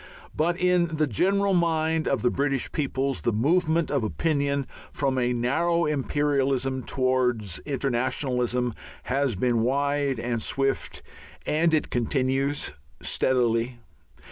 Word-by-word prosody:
But 170 Hz, +2 st, +1 dB
in 180 Hz, -2 st, +2 dB
the 155 Hz, 0 st, +2 dB
general 195 Hz, -, +1 dB
mind 160 Hz, -2 st, +1 dB
of 135 Hz, -6 st, 0 dB
the 120 Hz, -, +3 dB
British 140 Hz, -2 st, 0 dB
peoples 135 Hz, -3 st, -1 dB
the 120 Hz, -, +1 dB
movement 160 Hz, -, +1 dB
of 140 Hz, -5 st, +1 dB
opinion 140 Hz, +3 st, 0 dB, 0.3 s
from 135 Hz, -2 st, 0 dB
a 125 Hz, 0 st, +1 dB
narrow 165 Hz, +8 st, +1 dB
imperialism 135 Hz, -2 st, 0 dB
towards 125 Hz, -8 st, 0 dB
internationalism 125 Hz, -2 st, 0 dB, 0.3 s
has 135 Hz, -2 st, 0 dB
been 120 Hz, +4 st, +1 dB
wide 140 Hz, +1 st, 0 dB
and 120 Hz, -1 st, -2 dB
swift. 135 Hz, +4 st, -1 dB, 0.4 s
And 160 Hz, +2 st, +2 dB
it 155 Hz, -1 st, 0 dB
continues 135 Hz, +3 st, 0 dB, 0.3 s
steadily. 120 Hz, -1 st, +1 dB
135 Hz, 115 wpm, -26 LUFS, 125-155 Hz, 0.4 s, the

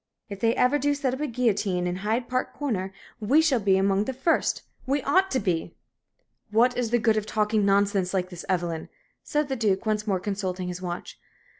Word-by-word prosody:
If 200 Hz, -1 st, -7 dB
they 230 Hz, +2 st, +2 dB
ever 250 Hz, +4 st, +3 dB
do 290 Hz, +1 st, +1 dB
set 275 Hz, -3 st, -1 dB
up 260 Hz, -, -4 dB
the 300 Hz, -, -1 dB
guillotine 210 Hz, -7 st, 0 dB
at 180 Hz, 0 st, -2 dB
Hyde 220 Hz, +5 st, -1 dB
Park 255 Hz, 0 st, -2 dB
Corner, 205 Hz, -10 st, -2 dB, 0.3 s
we 240 Hz, +8 st, +3 dB
shall 310 Hz, -6 st, +3 dB
be 195 Hz, -2 st, +3 dB
among 195 Hz, +1 st, +2 dB
the 265 Hz, -, -3 dB
first 290 Hz, +6 st, +1 dB, 0.2 s
we 275 Hz, 0 st, 0 dB
ought 375 Hz, +7 st, +3 dB
to 260 Hz, -, 0 dB
be!" 180 Hz, -6 st, -2 dB, 0.7 s
"What 240 Hz, +4 st, +3 dB
is 245 Hz, -2 st, -1 dB
the 240 Hz, -, +3 dB
good 225 Hz, -1 st, +2 dB
of 215 Hz, 0 st, -2 dB
talking 215 Hz, -1 st, +1 dB
nonsense 195 Hz, -2 st, +2 dB
like 185 Hz, -1 st, -1 dB
this, 175 Hz, -, -8 dB
Evelyn?" 170 Hz, -3 st, -1 dB, 0.3 s
said 300 Hz, -1 st, -1 dB
the 270 Hz, -, -2 dB
Duke, 210 Hz, -4 st, 0 dB
once 215 Hz, 0 st, -1 dB
more 190 Hz, -3 st, +1 dB
consulting 185 Hz, -2 st, -3 dB
his 180 Hz, 0 st, -6 dB
watch. 175 Hz, -1 st, -6 dB
215 Hz, 205 wpm, -26 LUFS, 190-255 Hz, 0.7 s, ever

